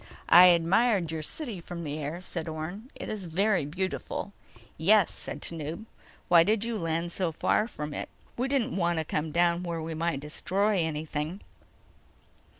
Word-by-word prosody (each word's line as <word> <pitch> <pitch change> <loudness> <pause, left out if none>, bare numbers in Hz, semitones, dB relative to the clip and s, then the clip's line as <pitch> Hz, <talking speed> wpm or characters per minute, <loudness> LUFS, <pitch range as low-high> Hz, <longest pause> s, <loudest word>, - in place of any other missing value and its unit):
"I 175 +2 +10
admired 180 +2 +4
your 160 -1 -3
city 225 - -5
from 170 0 -7
the 150 0 -4
air," 155 +4 -4
said 170 -2 -5
Orne. 170 +9 -6
"It - - -7
is 205 -4 -5
very 190 0 +2
beautiful." 185 +4 -3 0.4
"Yes," 195 +4 +4
said - - -6
Tanub. 165 +4 -5 0.4
"Why 170 -1 +7
did 210 +4 +2
you 235 -1 -2
land 165 0 -1
so 180 -2 -1
far 210 +6 +1
from 150 -9 -6
it?" - - -5 0.3
"We 250 +2 -1
didn't 265 -2 0
want 175 -2 +1
to 160 - -1
come 155 +1 -2
down 170 +1 +2
where 170 -2 -3
we 160 0 -4
might 165 -2 -1
destroy 190 +7 0
anything." 155 +2 -3
170 Hz, 165 wpm, -28 LUFS, 160-195 Hz, 0.4 s, I